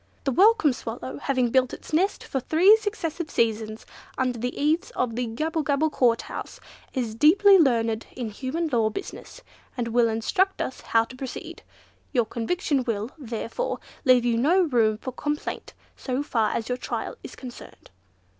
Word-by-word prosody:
The 275 Hz, -, 0 dB
Welcome 385 Hz, -, +5 dB
Swallow, 145 Hz, -, -6 dB
having 255 Hz, -, 0 dB
built 255 Hz, 0 st, +2 dB
its -, -, -14 dB
nest 370 Hz, +6 st, +1 dB
for 265 Hz, -, -2 dB
three 340 Hz, -, +6 dB
successive 350 Hz, -7 st, -4 dB
seasons 220 Hz, -1 st, -1 dB, 0.3 s
under 250 Hz, -2 st, 0 dB
the 245 Hz, +2 st, -3 dB
eaves 305 Hz, +4 st, +1 dB
of 235 Hz, -3 st, -1 dB
the 245 Hz, 0 st, -1 dB
Gabblegabble 310 Hz, +4 st, 0 dB
Court 235 Hz, -4 st, +2 dB
House, -, -, -7 dB, 0.4 s
is 240 Hz, -4 st, -1 dB
deeply 380 Hz, -, +6 dB
learned 230 Hz, -6 st, +2 dB
in 240 Hz, -4 st, -4 dB
human 275 Hz, +10 st, -3 dB
law 230 Hz, -5 st, +2 dB
business, 395 Hz, -, -8 dB, 0.3 s
and 235 Hz, -2 st, -2 dB
will 235 Hz, 0 st, +3 dB
instruct 370 Hz, -, 0 dB
us 260 Hz, -, -4 dB
how 225 Hz, 0 st, +2 dB
to 255 Hz, -, -12 dB
proceed. 260 Hz, 0 st, -7 dB, 0.5 s
Your 240 Hz, -4 st, +3 dB
conviction 270 Hz, -, -1 dB
will, 225 Hz, 0 st, -2 dB
therefore, 240 Hz, -, -4 dB, 0.2 s
leave 255 Hz, -3 st, +5 dB
you 235 Hz, -1 st, +2 dB
no 340 Hz, +9 st, +4 dB
room 230 Hz, -8 st, +2 dB
for 255 Hz, -, -6 dB
complaint 295 Hz, +4 st, -4 dB, 0.2 s
so 260 Hz, +1 st, -3 dB
far 225 Hz, -6 st, +1 dB
as 225 Hz, -, -3 dB
your 250 Hz, 0 st, -2 dB
trial -, -, -4 dB
is -, -, -10 dB
concerned." 250 Hz, -, -11 dB
255 Hz, 165 wpm, -25 LUFS, 230-310 Hz, 0.5 s, three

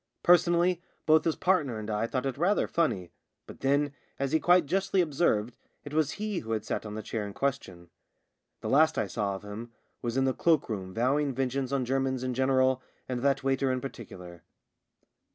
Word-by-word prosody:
Personally 175 Hz, 0 st, +4 dB, 0.2 s
both 155 Hz, 0 st, +5 dB
his 165 Hz, -, +1 dB
partner 155 Hz, -11 st, +1 dB
and 110 Hz, -1 st, -6 dB
I 110 Hz, +1 st, -1 dB
thought 130 Hz, +2 st, -2 dB
it 135 Hz, -2 st, -1 dB
rather 180 Hz, +7 st, +2 dB
funny 100 Hz, -, -1 dB, 0.2 s
— -, -, -55 dB
but -, -, -12 dB
then, 140 Hz, +1 st, +1 dB, 0.2 s
as 140 Hz, 0 st, -1 dB
he 160 Hz, -, +3 dB
quite 175 Hz, -1 st, +4 dB
justly 190 Hz, +4 st, 0 dB
observed, 135 Hz, -9 st, +1 dB, 0.3 s
it 145 Hz, -, -9 dB
was 155 Hz, -2 st, +1 dB
he 210 Hz, -3 st, -3 dB
who 115 Hz, -1 st, -4 dB
had 110 Hz, -1 st, -2 dB
sat 110 Hz, -, -3 dB
on 105 Hz, -, -6 dB
the 110 Hz, -, -5 dB
chair 110 Hz, 0 st, -3 dB
in 100 Hz, -1 st, -6 dB
question. 95 Hz, -11 st, -3 dB, 0.7 s
The -, -, -3 dB
last 160 Hz, +3 st, +4 dB
I -, -, +1 dB
saw 100 Hz, -3 st, -2 dB
of 95 Hz, -, -9 dB
him 110 Hz, +3 st, -7 dB, 0.3 s
was 120 Hz, +1 st, -2 dB
in 135 Hz, -, +3 dB
the 130 Hz, -, +2 dB
cloak 160 Hz, -3 st, +2 dB
room 95 Hz, -4 st, -4 dB
vowing 135 Hz, +6 st, +1 dB
vengeance 130 Hz, 0 st, -1 dB
on 135 Hz, -2 st, 0 dB
Germans 130 Hz, 0 st, 0 dB
in 130 Hz, -1 st, -1 dB
general 130 Hz, 0 st, +2 dB, 0.3 s
and 125 Hz, -2 st, -3 dB
that 140 Hz, 0 st, +1 dB
waiter 135 Hz, 0 st, +1 dB
in 130 Hz, -, 0 dB
particular. 90 Hz, -10 st, -9 dB
135 Hz, 200 wpm, -29 LUFS, 115-155 Hz, 0.7 s, both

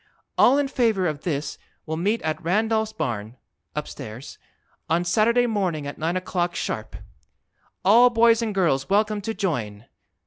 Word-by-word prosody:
All 265 Hz, +3 st, +5 dB
in 285 Hz, -1 st, +1 dB
Favor 225 Hz, -8 st, +1 dB
of 155 Hz, -3 st, -2 dB
this 150 Hz, -4 st, -3 dB, 0.3 s
will 160 Hz, -, -3 dB
Meet 205 Hz, +8 st, 0 dB
at 155 Hz, -1 st, -2 dB
Randolph's 220 Hz, +5 st, +1 dB
Barn 120 Hz, -, -4 dB, 0.4 s
(upstairs) 110 Hz, +5 st, -7 dB, 0.5 s
on 170 Hz, +2 st, +1 dB
Saturday 235 Hz, +6 st, +3 dB
Morning 185 Hz, -10 st, -1 dB
at 145 Hz, -, -7 dB
9 165 Hz, +3 st, 0 dB
o'clock 175 Hz, -1 st, -2 dB
Sharp. 110 Hz, -1 st, -4 dB, 0.9 s
ALL 235 Hz, +6 st, +7 dB
BOYS 230 Hz, -1 st, +4 dB
AND 220 Hz, -3 st, -2 dB
GIRLS 145 Hz, -8 st, +1 dB
WELCOME 210 Hz, +1 st, +2 dB
TO 225 Hz, +2 st, -4 dB
JOIN! 120 Hz, -, -3 dB
185 Hz, 145 wpm, -24 LUFS, 155-220 Hz, 0.9 s, ALL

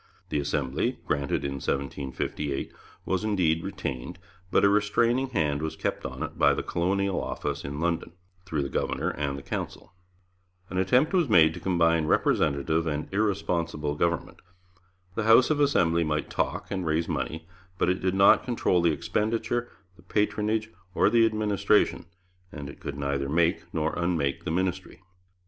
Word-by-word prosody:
The 75 Hz, -, 0 dB
Assembly, 70 Hz, -2 st, -1 dB
granted 70 Hz, -1 st, -1 dB
in 70 Hz, -1 st, -4 dB
1758, 70 Hz, 0 st, -3 dB, 0.3 s
was 95 Hz, +1 st, -1 dB
indeed 90 Hz, -7 st, +1 dB
retained, 65 Hz, +7 st, -5 dB, 0.3 s
but -, -, +3 dB
a -, -, +7 dB
restraining 115 Hz, +5 st, +2 dB
hand 75 Hz, -, 0 dB
was 80 Hz, 0 st, -3 dB
kept -, -, -3 dB
on -, -, -6 dB
it -, -, -7 dB
by 70 Hz, 0 st, +5 dB
the -, -, -3 dB
Colonial 95 Hz, +2 st, 0 dB
Office -, -, -4 dB
in 70 Hz, +1 st, -5 dB
London, 85 Hz, 0 st, -1 dB, 0.3 s
through 80 Hz, -6 st, -2 dB
the 70 Hz, -, -4 dB
governor -, -, -1 dB
and 70 Hz, -2 st, -3 dB
the 70 Hz, -, -9 dB
Council. -, -, -6 dB, 0.8 s
An 90 Hz, -, -1 dB
attempt 125 Hz, -, +3 dB
was 175 Hz, -7 st, +2 dB
made 80 Hz, -6 st, +6 dB
to 90 Hz, -, -7 dB
combine 85 Hz, -3 st, +2 dB
representative 80 Hz, +2 st, +1 dB
and 75 Hz, +3 st, -3 dB
irresponsible 85 Hz, -7 st, 0 dB
government. 85 Hz, +1 st, -1 dB, 0.7 s
The 110 Hz, +2 st, -2 dB
House 115 Hz, +6 st, +6 dB
of 150 Hz, -, +1 dB
Assembly 85 Hz, -, +3 dB
might 75 Hz, -1 st, -2 dB
talk, -, -, -2 dB
and 95 Hz, -2 st, -2 dB
raise 80 Hz, 0 st, 0 dB
money, 80 Hz, +1 st, -3 dB, 0.3 s
but -, -, +1 dB
it 90 Hz, +1 st, +1 dB
did 95 Hz, 0 st, 0 dB
not 95 Hz, 0 st, +6 dB
control 115 Hz, -7 st, +1 dB
the 85 Hz, -, +3 dB
expenditure, 115 Hz, +7 st, -1 dB, 0.3 s
the -, -, -17 dB
patronage, 105 Hz, +3 st, 0 dB, 0.2 s
or -, -, +4 dB
the 115 Hz, -1 st, +5 dB
administration, 105 Hz, -4 st, +1 dB, 0.4 s
and 70 Hz, -2 st, -7 dB
it -, -, -16 dB
could 70 Hz, -, -6 dB
neither 70 Hz, -1 st, -2 dB
make 85 Hz, +3 st, +1 dB
nor 80 Hz, -2 st, -1 dB
unmake 85 Hz, -6 st, -1 dB
the -, -, -1 dB
ministry. 95 Hz, +2 st, -2 dB
85 Hz, 160 wpm, -27 LUFS, 75-100 Hz, 0.8 s, a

